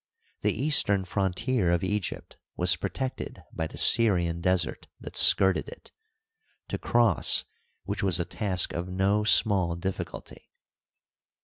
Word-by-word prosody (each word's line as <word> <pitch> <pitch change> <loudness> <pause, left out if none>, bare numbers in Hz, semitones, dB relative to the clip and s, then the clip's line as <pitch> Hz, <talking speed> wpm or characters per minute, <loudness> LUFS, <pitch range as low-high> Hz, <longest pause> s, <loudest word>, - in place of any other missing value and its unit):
The - - +1
eastern 105 -10 +2
frontier 100 +3 -1
of 85 0 0
Egypt 100 0 -4 0.2
was 90 +1 +2
protected 130 +9 -6
by 80 - -4
the - - -12
Syrian 85 -7 +3
Desert 90 -2 -1
that - - -11
skirted 95 -1 +4
it, - - -13 0.8
to - - -4
cross 120 -6 +2 0.4
which 100 0 -5
was 95 -2 +2
a 85 - -2
task 95 -4 0
of 85 +1 -5
no 95 +3 0
small 95 -5 +2
difficulty. 95 +2 -7
95 Hz, 125 wpm, -26 LUFS, 90-105 Hz, 0.8 s, skirted